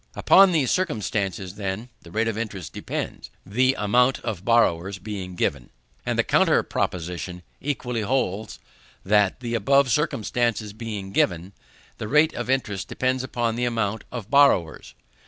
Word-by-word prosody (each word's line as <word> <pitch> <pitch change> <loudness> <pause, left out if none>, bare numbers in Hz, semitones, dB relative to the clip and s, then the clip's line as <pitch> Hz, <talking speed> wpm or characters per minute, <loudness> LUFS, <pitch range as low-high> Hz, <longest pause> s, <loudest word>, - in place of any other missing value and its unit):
Upon 195 0 +6
these 150 -7 +2
circumstances, 105 - -2
then, 100 +4 -4
the 85 - -14
rate 110 +6 0
of 115 - -1
interest 105 -7 -5
depends, - - -5 0.2
the 130 +6 +2
amount 125 +5 +3
of 105 -6 -4
borrowers 100 -5 +2
being 95 -2 -6
given. 70 -7 -1 0.4
And - - 0
the - - +3
counter - - +3
proposition 90 +1 -3 0.2
equally 125 -5 -2
holds, 110 -3 -1 0.5
that, 105 +2 +2
the 120 -1 -4
above 135 +4 +3
circumstances 120 -6 0
being 105 -3 -6
given, 90 0 0 0.5
the 105 - -4
rate 150 +5 +4
of 120 0 -5
interest 105 -8 -1
depends 130 0 -1
upon 120 -3 -1
the 125 +1 0
amount 110 -3 -1
of 120 -3 -7
borrowers. 140 - +3
110 Hz, 145 wpm, -24 LUFS, 95-125 Hz, 0.5 s, Upon